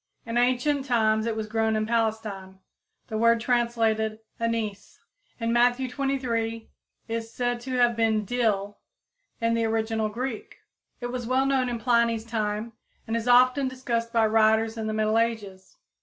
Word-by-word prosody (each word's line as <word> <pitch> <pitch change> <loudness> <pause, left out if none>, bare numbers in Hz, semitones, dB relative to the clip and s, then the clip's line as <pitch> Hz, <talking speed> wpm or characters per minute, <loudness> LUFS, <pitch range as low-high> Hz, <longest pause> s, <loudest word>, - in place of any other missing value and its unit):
In 230 0 -5
ancient 255 +3 +1
times 220 -3 +2
it 225 - -1
was 220 -1 -3
grown 220 0 0
in 215 0 0
Palestine. 215 -4 -2 0.5
The 220 - -2
word 230 0 +4
translated, 225 -2 +1 0.2
"anise" 225 -3 -3 0.4
in 230 0 0
Matthew 245 +2 +3
xxiii, 245 - -11 0.2
23, 230 -3 -3 0.4
is 225 0 -4
said 245 0 -1
to 255 +1 -5
have 240 -1 +3
been 220 -2 +1
"dill" 205 -3 -1 0.6
in 230 -1 +1
the 230 0 +1
original 220 -1 0
Greek. 240 +1 -5 0.4
It 245 0 -4
was 245 -2 -4
well 260 +2 +2
known 265 -2 +1
in 240 - -2
Pliny's 230 -1 +1
time, 220 0 -3 0.3
and 225 - -2
is 230 +1 -2
often 255 +2 +5
discussed 235 -3 -3
by 230 -1 +3
writers 220 +1 +3
in 220 -1 -4
the 215 - -2
middle 215 +1 +2
ages. 220 - -3
230 Hz, 160 wpm, -26 LUFS, 220-245 Hz, 0.6 s, often